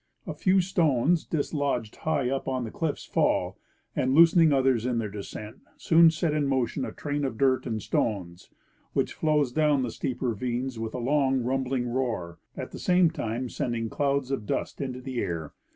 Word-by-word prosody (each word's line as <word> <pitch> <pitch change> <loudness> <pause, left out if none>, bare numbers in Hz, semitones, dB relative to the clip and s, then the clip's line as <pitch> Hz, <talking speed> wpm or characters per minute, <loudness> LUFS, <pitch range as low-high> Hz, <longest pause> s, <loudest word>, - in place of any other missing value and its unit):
A - - -4
few 190 -1 +3
stones 165 -3 +2
dislodged 140 -7 -2
high 145 -5 0
up 135 +1 -2
on 130 -1 -1
the 110 - -5
cliffs 160 -3 -3
fall, - - 0 0.4
and, 130 +1 +1
loosening 165 0 +6
others 130 -4 +2
in 125 -1 0
their 110 -3 -2
descent, 105 +2 -8 0.2
soon 165 0 +6
set 160 -1 -1
in 150 -2 +1
motion 130 -3 0
a - - -5
train 145 0 -3
of 130 -5 -2
dirt 130 0 +2
and 110 -2 -2
stones, 90 -5 -2 0.4
which - - 0
flows 150 -4 +1
down 150 -1 +2
the 120 - -2
steep 130 +3 -4
ravines 125 +1 -2
with 110 +1 -4
a - - -2
long 135 0 +1
rumbling 130 0 -1
roar, 120 -9 -2 0.2
at - - -5
the - - -8
same 180 -2 +3
time 120 -4 -3
send 120 0 -3
ing 115 -1 -2
clouds 140 -2 0
of 110 -7 -3
dust - - -3
into 130 -2 -4
the 130 -1 -4
air. 80 -6 -3
130 Hz, 185 wpm, -27 LUFS, 120-145 Hz, 0.4 s, loosening